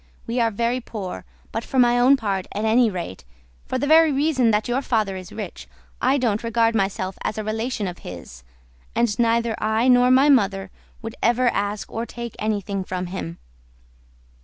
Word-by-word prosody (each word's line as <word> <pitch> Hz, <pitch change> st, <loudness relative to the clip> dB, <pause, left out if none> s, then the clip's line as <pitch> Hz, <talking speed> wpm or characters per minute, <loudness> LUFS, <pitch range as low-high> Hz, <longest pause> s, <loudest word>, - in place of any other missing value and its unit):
We 235 Hz, +2 st, -2 dB
are 230 Hz, -1 st, +3 dB
very 235 Hz, +4 st, -1 dB
poor, 205 Hz, -6 st, -6 dB, 0.3 s
but 225 Hz, -, -3 dB
for 265 Hz, -, -5 dB
my 245 Hz, -1 st, +5 dB
own 260 Hz, +3 st, +6 dB
part 195 Hz, -6 st, -2 dB
at 210 Hz, +2 st, -2 dB
any 230 Hz, +1 st, +4 dB
rate, 175 Hz, -, -6 dB, 0.4 s
for 255 Hz, -, -1 dB
the 255 Hz, -, -1 dB
very 320 Hz, +1 st, +6 dB
reason 275 Hz, -4 st, +2 dB
that 210 Hz, 0 st, +1 dB
your 245 Hz, +3 st, 0 dB
father 215 Hz, -7 st, 0 dB
is 185 Hz, -1 st, -8 dB
rich, -, -, -7 dB, 0.3 s
I 265 Hz, +2 st, +3 dB
don't 230 Hz, -5 st, 0 dB
regard 230 Hz, 0 st, +2 dB
myself 195 Hz, -2 st, -1 dB
as 215 Hz, -, -2 dB
a 215 Hz, -, -2 dB
relation 220 Hz, 0 st, -2 dB
of 180 Hz, -1 st, -7 dB
his, 85 Hz, -8 st, -10 dB, 0.5 s
and 235 Hz, -2 st, +1 dB
neither 230 Hz, 0 st, +2 dB
I 220 Hz, +3 st, +1 dB
nor 250 Hz, 0 st, +5 dB
my 260 Hz, +3 st, +5 dB
mother 195 Hz, -8 st, +2 dB, 0.3 s
would 225 Hz, 0 st, -5 dB
ever 240 Hz, +1 st, +3 dB
ask 205 Hz, -1 st, -3 dB
or 230 Hz, +1 st, -4 dB
take 235 Hz, 0 st, -7 dB
anything 205 Hz, -2 st, -2 dB
from 185 Hz, 0 st, -4 dB
him." 85 Hz, -, -5 dB
225 Hz, 185 wpm, -23 LUFS, 200-245 Hz, 0.5 s, own